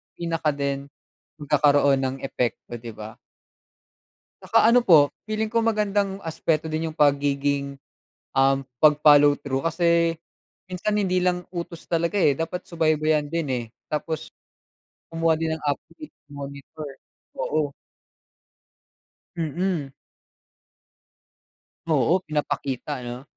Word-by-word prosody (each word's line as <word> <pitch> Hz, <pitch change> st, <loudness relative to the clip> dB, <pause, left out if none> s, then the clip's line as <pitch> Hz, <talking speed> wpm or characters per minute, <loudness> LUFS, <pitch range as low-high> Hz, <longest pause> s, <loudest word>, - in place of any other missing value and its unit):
pinaka 165 Hz, -3 st, -1 dB
din 140 Hz, 0 st, -2 dB, 0.5 s
magkakaroon 145 Hz, -1 st, +3 dB
ng 130 Hz, 0 st, -1 dB
epekto, 120 Hz, -2 st, -3 dB
'di 115 Hz, +1 st, -8 dB
ba? 110 Hz, 0 st, -9 dB, 1.3 s
Tsaka 225 Hz, -, +4 dB
ano 245 Hz, +1 st, +6 dB
po, 145 Hz, -5 st, +7 dB, 0.2 s
feeling 215 Hz, 0 st, -2 dB
ko 230 Hz, -, +1 dB
magandang 205 Hz, -3 st, 0 dB
aspeto 160 Hz, -1 st, -1 dB
din 160 Hz, +1 st, -1 dB
yung -, -, -12 dB
pagiging, 140 Hz, -1 st, +1 dB, 0.6 s
um, 135 Hz, 0 st, +3 dB, 0.2 s
pag-follow 145 Hz, -1 st, +6 dB
through. 140 Hz, -2 st, -3 dB
Kasi 170 Hz, 0 st, +2 dB, 0.6 s
minsan 205 Hz, +4 st, -1 dB
hindi 190 Hz, -3 st, +1 dB
lang 180 Hz, 0 st, 0 dB
utos 170 Hz, -2 st, -6 dB
talaga, 170 Hz, +3 st, -1 dB
eh, 190 Hz, -7 st, +4 dB
dapat 170 Hz, +2 st, -3 dB
subaybayan 155 Hz, -2 st, +1 dB
din, 165 Hz, 0 st, -2 dB
eh. 125 Hz, -2 st, -1 dB, 0.3 s
Tapos 155 Hz, +1 st, -3 dB, 0.8 s
kumuha 165 Hz, -1 st, +2 dB
din 160 Hz, 0 st, -1 dB
ng 160 Hz, -1 st, -5 dB
update, 305 Hz, -, -5 dB, 0.2 s
i-monitor, 140 Hz, +2 st, -8 dB, 0.5 s
oo. 150 Hz, -2 st, -1 dB, 1.6 s
Mm. 165 Hz, -2 st, -2 dB, 2.0 s
Oo, 160 Hz, +3 st, +3 dB
pinapakita 145 Hz, -2 st, -3 dB
'no. 120 Hz, +2 st, -6 dB
155 Hz, 110 wpm, -24 LUFS, 140-170 Hz, 2.0 s, po